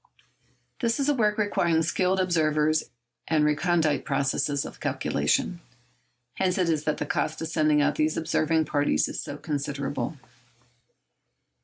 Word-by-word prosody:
This 235 0 0
is 280 +1 +1
a - - +4
work 210 -5 +1
requiring 170 -6 +1
skilled 185 +3 +1
observers 155 -3 +2 0.4
and 155 -2 +2
recondite 155 0 +1
processes 140 +1 0
of - - -10
calculation. 175 -1 0 0.8
Hence 185 -1 +1
it 180 -3 +1
is 155 -2 0
that 150 - 0
the 150 - -3
cost - - -2
of 160 - -4
sending 155 -2 +3
out 145 0 +1
these 155 0 +1
observing 160 0 +1
parties 145 - +1
is - - -5
so - - -6
considerable. 140 -1 -3
155 Hz, 140 wpm, -26 LUFS, 150-175 Hz, 0.8 s, a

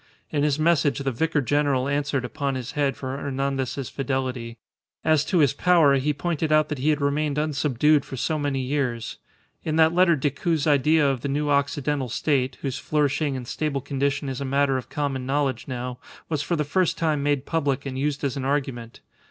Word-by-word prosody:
In 145 - 0
his 145 -1 +2
message 155 -4 +2
the 135 -1 -1
Vicar 155 +4 0
General 140 -1 +1
answered 140 -2 -1
upon 140 +2 -2
his 130 -1 -5
head 140 -2 0
for 130 0 -4
Hernandez's 135 -1 -2
fidelity. 130 -3 -3 0.5
As 155 -2 +3
to 185 - 0
his 145 -5 +4
power, 165 -3 +4
he 140 +3 +1
pointed 155 +1 -2
out 155 0 +4
that 150 -3 -3
he 145 +4 +1
had 150 -1 +2
remained 145 +1 0
unsubdued 150 -1 +2
for 130 - -8
so 155 +5 -1
many 140 -2 -1
years. 125 -4 -2 0.5
In 155 - -1
that 160 0 +5
letter 175 -1 +5
Decoud's 145 +2 -1
idea 150 +1 +4
of 135 -3 0
the - - -2
new 145 +1 0
Occidental 140 -1 0
State 130 +1 0
(whose 135 -3 -2
flourishing 145 -1 0
and 125 -2 -7
stable 150 -1 -2
condition 140 +1 -1
is 135 0 -4
a - - -1
matter 140 0 +1
of 130 - -4
common 135 -3 -2
knowledge 140 -1 -1
now) 125 -1 -5 0.3
was 155 -3 -1
for 170 +4 -1
the 150 - 0
first 180 +4 +1
time 155 -3 0
made 145 -1 0
public 145 -4 -1
and 135 -1 -4
used 145 +1 -1
as 140 -1 -1
an 135 - -3
argument. 130 -4 -2
140 Hz, 195 wpm, -24 LUFS, 135-150 Hz, 0.5 s, that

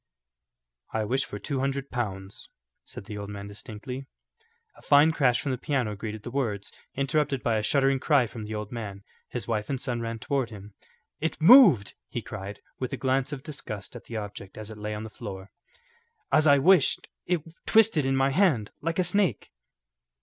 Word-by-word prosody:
"I 110 - 0
wish 130 +5 0
for - - -7
two 140 -3 -3
hundred 135 +1 -2
pounds," 95 -5 -4 0.4
said - - -8
the 105 -1 -6
old 100 0 -6
man 100 0 -7
distinctly. 125 +6 -8 0.7
A - - -17
fine 145 +2 +6
crash 130 -6 +3
from 140 - -2
the 130 - -2
piano 130 -7 -1
greeted 105 0 -6
the 120 - -6
words, 115 -7 -2 0.2
interrupted 140 0 0
by 115 -2 +2
a - - +1
shuddering 135 +4 +2
cry 140 -3 +3
from 115 -1 -7
the 110 +1 -5
old 105 -1 -5
man. 100 -4 -6 0.3
His - - -5
wife 105 -1 -1
and 135 - -1
son 125 -2 -2
ran 115 0 -3
toward 130 +1 -1
him. 105 -1 -11 0.5
"It 160 - -2
moved," 170 - +8 0.2
he - - -4
cried, 100 +2 -7 0.2
with 130 - -3
a - - -2
glance 130 +1 0
of 135 -3 -6
disgust 125 - -7
at 120 - -9
the 115 - -5
object 100 -2 -7
as 110 0 -7
it 110 - -9
lay 105 0 -3
on 105 - -5
the 110 - -8
floor. 100 -4 -8 0.8
"As 155 0 +5
I 140 -1 +7
wished, 170 +1 +4 0.2
it 175 -4 +1 0.2
twisted 220 -8 +5
in 135 0 +1
my 135 +1 +3
hand 145 - +2
like 165 +2 -2
a 185 - +3
snake." 185 +1 +1
125 Hz, 195 wpm, -27 LUFS, 105-140 Hz, 0.8 s, moved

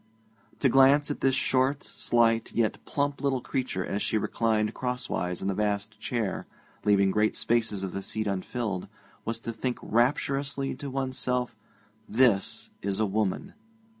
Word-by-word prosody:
To 140 - +5
glance 135 +3 +5
at - - -5
this 135 -1 +3
short, 130 +2 +2
slight, 115 -1 +1
yet 110 -2 0
plump 140 -1 -1
little 135 -2 +1
creature 125 -7 -2
as 100 - -2
she - - +1
reclined 110 0 +1
crosswise 125 -9 -2
in - - -1
the 100 - +1
vast 105 +1 -1
chair, 115 -5 -2 0.4
leaving 100 -2 +4
great 105 +2 +2
spaces 110 -4 0
of 95 - -3
the 100 - -4
seat 110 +2 -3
unfilled, 100 0 -2 0.4
was 115 +1 -2
to 115 - -4
think 125 +2 -2
rapturously 135 +3 +1
to 140 - -5
one's 130 -1 -2
self: 125 -2 -1 0.5
This 115 -4 +2
is 100 +1 -2
a 110 - +3
woman. 105 - -1
115 Hz, 155 wpm, -28 LUFS, 105-130 Hz, 0.5 s, To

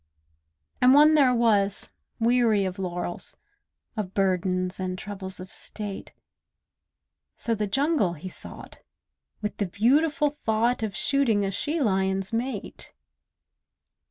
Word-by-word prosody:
And 255 +2 +6
one 300 +2 +7
there 270 -5 +4
was, 210 -4 +2 0.3
weary 230 -3 +3
of 185 +1 -4
laurels, 175 -1 -3 0.6
Of 200 -4 -4
burdens 185 -1 0
and 185 0 -3
troubles 190 -2 -7
of 185 +1 -9
State; 205 -2 -3 1.3
So 230 - -1
the 210 -1 -1
jungle 270 - +1
he 170 +3 -8
sought, - - -8 0.6
with 210 - -3
the 200 - -1
beautiful 285 - +2
thought 225 +3 +1
Of 215 -3 -3
shooting 245 -8 +2
a 195 - -2
she 300 - -2
lion's 190 -4 0
mate. 250 +3 -4
210 Hz, 120 wpm, -26 LUFS, 190-250 Hz, 1.3 s, one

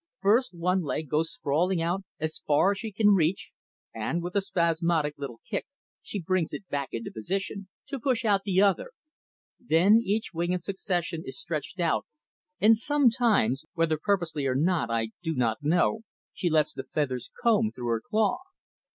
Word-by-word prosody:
First, 210 +3 +2
one 180 +2 +1
leg 155 -1 -3
goes 160 +3 +1
sprawling 180 - 0
out 175 +4 0 0.2
as 155 0 -3
far 155 +6 +4
as 200 - -3
she 220 - -5
can 210 +1 +3
reach, 185 -2 +2 0.4
and, 160 +10 -2
with 175 +2 -5
a 200 - +3
spasmodic 170 -4 +1
little 140 -5 -7
kick, - - -3 0.3
she 205 - -5
brings 180 -1 -1
it 195 - -6
back 140 -1 -2
into 115 0 -5
position, 195 - -4 0.2
to 275 -1 -5
push 245 -1 0
out 200 -2 +3
the 195 -1 +3
other. 205 - +1 0.7
Then 205 +2 +4
each 215 +1 -1
wing 170 +2 -1
in 180 - -2
succession 180 -4 -2
is - - -6
stretched - - -4
out, - - +1 0.5
and 220 +2 +6
sometimes, 230 - +2
whether 165 -2 +1
purposely 165 -7 0
or 130 - 0
not 160 -3 +1
I 115 -1 0
do 165 -2 -2
not 115 -3 0
know, 170 +8 +2 0.3
she 175 - -1
lets 155 -2 +2
the - - -5
feathers 130 -5 -2
comb 220 -2 +3
through 120 -1 -5
her 115 -1 0
claw. 215 - +1
175 Hz, 175 wpm, -27 LUFS, 155-205 Hz, 0.7 s, and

